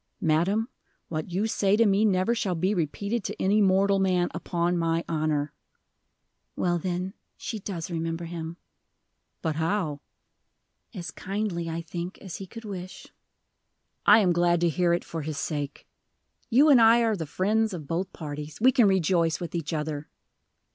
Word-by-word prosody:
"Madam, 190 +6 +1 0.4
what 155 0 -3
you 190 +5 0
say 205 -2 +2
to 230 - +5
me 200 +1 +3
never 195 +1 +2
shall 205 -6 -1
be 185 +5 +1
repeated 200 +6 -2
to - - -5
any 205 +3 +3
mortal 195 0 +3
man, 180 -2 +2
upon 175 0 -1
my 165 0 0
honor." 155 -2 -1 1.0
"Well, 175 -1 +1
then, 180 +2 -3 0.2
she 220 - -5
does 185 -3 -5
remember 165 0 -3
him." 165 0 -6 0.9
"But 160 -3 -1
how?" 160 -3 -1 0.9
"As 175 -6 -6
kindly, 190 -4 -3
I 165 +1 -4
think, 175 +3 -6
as 190 -4 -8
he 195 - -8
could 230 +3 -10
wish." 185 -3 -8 0.9
"I - - +8
am 180 -3 +3
glad 175 0 +3
to 170 - +3
hear 175 +2 +1
it, 170 - 0
for 165 - -5
his 150 0 -4
sake. 145 -2 -4 0.6
You 270 +6 +5
and 255 -4 +7
I 230 +1 +6
are 225 -2 +2
the 160 -5 -5
friends 215 +7 +1
of 170 -6 -6
both 180 +5 -2
parties: 150 -1 -7
we 255 +4 +6
can 245 -5 +5
rejoice 170 -3 +2
with 170 -3 -6
each 165 -4 -3
other." 150 -1 -3
175 Hz, 165 wpm, -27 LUFS, 165-200 Hz, 1.0 s, I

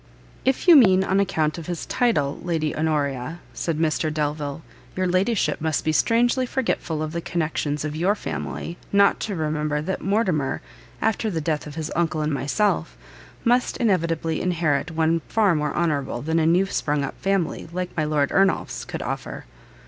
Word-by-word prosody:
"If 265 +6 +1
you 345 - +10
mean 190 -9 +6
on 190 0 +1
account 160 -5 0
of 165 - -9
his 175 -2 -4
title, 185 - +1
Lady 160 -3 -1
Honoria," 150 -1 -1
said 165 -3 -2
Mr 155 0 0
Delvile; 150 0 -2 0.3
"your 185 - 0
ladyship 185 +2 +1
must 160 -1 0
be 155 - +2
strangely 240 - +2
forgetful 175 -12 -1
of 155 - -4
the 170 +1 -3
connections 155 -3 -2
of 150 0 -4
your 185 +6 +2
family, 170 -4 -5
not 200 0 +4
to 205 - -3
remember 150 -2 -1
that 175 +6 -3
Mortimer, 185 -9 0 0.4
after 220 0 +1
the 170 -5 -2
death 155 -1 -2
of 150 - -9
his 160 -1 -4
uncle 160 -2 0
and 150 0 0
myself, 195 +10 0 0.5
must 245 +1 +2
inevitably 165 -8 0
inherit 165 -4 0
one 160 0 +1
far 210 -5 +3
more 150 -1 0
honourable 140 -7 -1
than 160 +2 +1
a 160 - +2
new 175 +4 +4
sprung 150 -6 -1
up - - -3
family, 195 -5 -1
like 180 +1 -4
my 155 - +1
Lord 150 -2 +1
Ernolf's, 195 -1 +1
could - - -5
offer." - - -5
165 Hz, 170 wpm, -23 LUFS, 150-190 Hz, 0.5 s, you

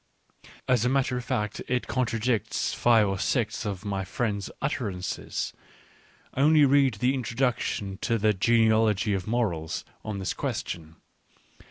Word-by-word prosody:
As 125 -3 +3
a 125 - +2
matter 130 -1 +1
of 125 - -3
fact 105 -3 -2
it 125 0 0
con 125 +1 0
tradicts 115 -2 -1
five 115 -3 +4
or 95 -1 -2
six 115 0 0
of 100 0 -5
my 100 -1 -2
friend's 100 +1 -2
utterances: 100 -9 -3 0.8
only 150 +2 +5
read 135 -3 +4
the 125 +6 +1
introduction 120 -6 -1
to 115 -1 +1
The 105 0 +3
Genealogy 110 0 +3
of 95 0 -2
Morals 95 -9 -1 0.2
on 105 -2 -4
this 95 -1 -2
question. 80 -2 -4
110 Hz, 140 wpm, -27 LUFS, 100-125 Hz, 0.8 s, only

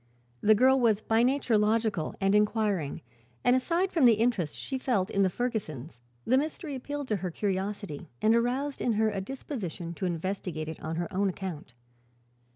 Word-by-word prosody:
The 215 +1 +6
girl 260 +4 +5
was 225 -4 +3
by 225 +1 +2
nature 250 -3 +2
logical 210 -5 +1
and 195 0 +2
inquiring 210 -7 +1 0.4
and 245 - +5
aside 340 +9 +1
from 315 -7 +3
the 235 -2 +7
interest 215 -8 0
she 265 -1 -4
felt 220 -8 0
in 200 - +1
the 190 - +4
Fergusons 175 - -4 0.3
the 255 +2 +4
mystery 305 +1 -4
appealed 285 +2 -5
to 210 - +1
her 185 -1 -3
curiosity 190 -4 -3
and 220 - +4
aroused 255 +5 0
in 240 - +1
her 220 0 +2
a 195 -2 -3
disposition 190 - -5
to 185 +2 -2
investigate 170 -2 -3
it 160 - -7
on 160 +1 -4
her 170 +1 -2
own 195 +1 +2
account. 170 -9 -6
210 Hz, 175 wpm, -29 LUFS, 185-245 Hz, 0.4 s, the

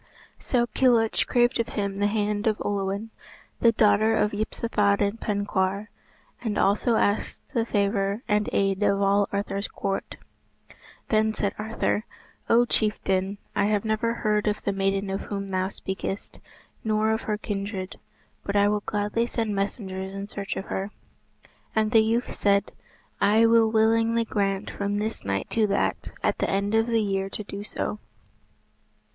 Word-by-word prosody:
So 240 -2 +1
Kilhuch 235 -1 +2
craved 240 0 +3
of 230 - +1
him 200 -1 -1
the 205 - +3
hand 210 0 0
of 215 -1 +1
Olwen, 200 +2 -2 0.5
the 230 - +5
daughter 215 0 +4
of 210 - +2
Yspathaden 205 -1 0
Penkawr, 200 -1 -1 0.5
and 220 -3 -2
also 210 +4 +2
asked 205 -1 0
the 230 -3 0
favour 200 +1 0
and 210 -1 +1
aid 195 0 +1
of 200 -1 +3
all 200 0 +3
Arthur's 200 0 -2
court. 195 -1 -3 0.9
Then 220 0 +2
said 200 -1 -1
Arthur, 220 0 -1 0.4
"O 240 +1 +5
chieftain, 200 -3 0 0.2
I - - +2
have 210 0 +1
never 220 +2 0
heard 210 -2 0
of 210 0 -1
the 200 - 0
maiden 195 0 0
of 195 - -2
whom 200 -1 -5
thou 185 0 0
speakest, 190 0 -5 0.4
nor 220 0 +2
of 220 +1 0
her 210 -1 -2
kindred, 200 -2 -4 0.4
but 200 - -3
I 205 0 +5
will 210 0 0
gladly 210 +3 0
send 225 -3 -2
messengers 195 -1 -3
in 195 0 -4
search 200 -1 -5
of 190 - -4
her." 195 +1 -3 0.9
And 215 -1 +2
the 225 - +6
youth 230 +2 0
said, 200 0 +2 0.5
"I 220 +3 +5
will 225 -1 +5
willingly 225 +1 +3
grant 200 -2 -1
from 200 0 -2
this 215 +2 -3
night 100 0 -2
to 220 -2 +2
that 200 - 0
at - - +1
the - - 0
end 200 +2 0
of 225 +1 +3
the 230 -2 +2
year 195 -1 -1
to 210 - -5
do 200 0 -7
so." 210 0 -3
205 Hz, 160 wpm, -26 LUFS, 200-220 Hz, 0.9 s, the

